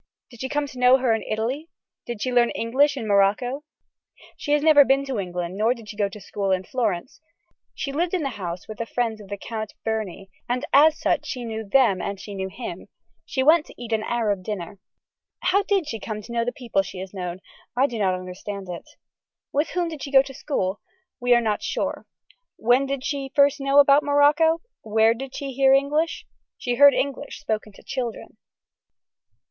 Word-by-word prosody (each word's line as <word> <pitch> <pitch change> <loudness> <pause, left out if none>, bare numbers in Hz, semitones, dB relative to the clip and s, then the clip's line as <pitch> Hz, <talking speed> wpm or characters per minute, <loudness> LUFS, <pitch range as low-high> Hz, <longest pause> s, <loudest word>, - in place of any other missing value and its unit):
Did 235 - -14
she 260 - -3
come 290 0 0
to 260 -3 -10
know 250 +1 +6
her 255 -3 +2
in 220 - -1
Italy. 250 +9 -3 0.4
Did 235 -3 -4
she 255 - -1
learn 240 -1 +4
English 275 +5 +1
in 225 -4 -4
Morocco. 210 +8 +2 0.7
She 290 - -5
has 295 0 +2
never 305 -2 +8
been 275 +1 +2
to 265 -5 -3
England 180 -1 -4
nor 225 +4 +2
did 225 -3 -13
she - - -7
go 205 -1 0
to 210 - -10
school 200 0 -3
in 185 -1 +1
Florence. 220 - -2 0.5
She 275 - -3
lived 340 +5 0
in 350 - -1
the 275 - -1
house 180 -5 -6
with 215 - -8
the 230 - -3
friends 225 -3 -2
of 200 - -12
the 200 +1 -5
count 215 0 -6
Berny 205 -4 -3 0.2
and 250 +3 -1
as 305 +2 +6
such - - 0
she 250 -3 -4
knew 220 -1 -4
them 205 -4 +3
and 200 -1 -4
she 205 - -8
knew 190 -1 -4
him. 225 +6 -7 0.4
She 260 - 0
went 315 +2 +5
to - - -15
eat 235 -2 -5
an 220 - +1
Arab 215 -4 -1
dinner. 195 -1 -6 0.6
How 375 +3 +3
did 395 -5 0
she 225 -6 -4
come 215 -1 -5
to 235 - -11
know 235 0 0
the 245 - -1
people 235 -7 -1
she 190 0 -9
has 185 +1 -7
known. 180 -2 -5 0.4
I 265 - +5
do 240 -5 -3
not 190 -3 +2
understand 185 +1 -7
it. 175 - -7 0.6
With 295 +3 +1
whom 355 -1 -1
did 315 -4 -7
she - - -5
go 270 -1 +7
to 275 - -10
school. 205 -9 -2 0.4
We 245 0 +4
are 240 - +4
not 215 -2 -1
sure. - - -3 0.5
When 245 +4 +3
did 275 -1 -3
she 280 -2 -3
first 280 0 +4
know 275 +1 +2
about 280 0 +6
Morocco. 295 +3 +4 0.2
Where 220 +1 +3
did 265 +3 -8
she 275 -1 -4
hear 270 +1 +5
English. 295 +4 0 0.3
She 245 - -2
heard 285 +3 +7
English 280 +1 -3
spoken 215 -5 -3
to - - -17
children. 245 -4 -5
240 Hz, 205 wpm, -24 LUFS, 205-280 Hz, 0.7 s, never